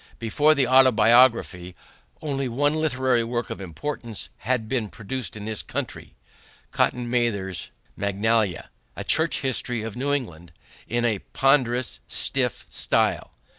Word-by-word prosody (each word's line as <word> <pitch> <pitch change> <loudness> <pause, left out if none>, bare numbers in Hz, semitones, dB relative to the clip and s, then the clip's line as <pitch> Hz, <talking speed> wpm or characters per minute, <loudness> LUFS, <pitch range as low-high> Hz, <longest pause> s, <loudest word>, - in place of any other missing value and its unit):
Before 145 +7 +3
the 140 -3 +2
Autobiography 120 -7 +4 0.5
only 135 -3 -2
one 145 +5 +1
literary 130 -6 +1
work 120 -1 -3
of - - -6
importance 115 - -4
had 120 -1 -1
been 110 -3 -1
produced 115 +3 -5
in 105 - -7
this 110 -1 -2
country - - -6 0.6
Cotton 125 -1 0
Mather's 115 -7 -1 0.3
Magnalia, 100 -1 0 0.2
a - - -5
church 160 +1 +1
history 125 -3 -1
of 115 -1 -6
New 135 +3 -1
England 85 - -4 0.3
in 120 +1 0
a 110 -4 +1
ponderous, 130 -2 +1
stiff - - -1
style. - - 0
120 Hz, 130 wpm, -24 LUFS, 110-130 Hz, 0.6 s, Autobiography